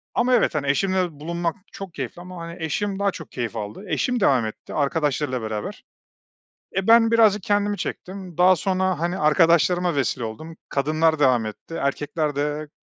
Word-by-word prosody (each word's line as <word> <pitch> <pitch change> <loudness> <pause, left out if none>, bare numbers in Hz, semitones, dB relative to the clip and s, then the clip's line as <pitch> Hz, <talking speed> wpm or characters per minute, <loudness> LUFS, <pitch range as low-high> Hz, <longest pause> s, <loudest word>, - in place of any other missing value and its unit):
ama 250 +1 +2
evet, 225 -8 +3
hani, 145 -2 -1
eşimle 185 +4 +1
bulunmak 170 +2 -2 0.2
çok 195 -4 -8
keyifli 135 +5 -6
ama, 180 -1 -9
hani, 170 0 -7
eşim 195 +5 -2
daha 200 0 +2
çok 160 -4 -10
keyif 120 -2 -4
aldı, 105 - -6
eşim 250 +6 0
devam 130 - +3
etti 110 - -8
arkadaşlarıyla 145 -3 0
beraber. 110 -1 -5 0.9
Eee, 195 +2 -1
ben 230 0 +6
birazcık 215 -4 +4
kendimi 205 0 +1
çektim 185 -1 -6
daha 185 +1 +6
sonra, 185 0 0
hani, 175 +2 -1
arkadaşlarıma 170 +2 +3
vesile 135 -2 0
oldum, 155 +9 -7
kadınlar 155 +3 +1
devam 130 -5 +3
etti, 110 +9 -8
erkekler 145 +1 -1
de 150 +1 -2
165 Hz, 165 wpm, -23 LUFS, 145-190 Hz, 0.9 s, ben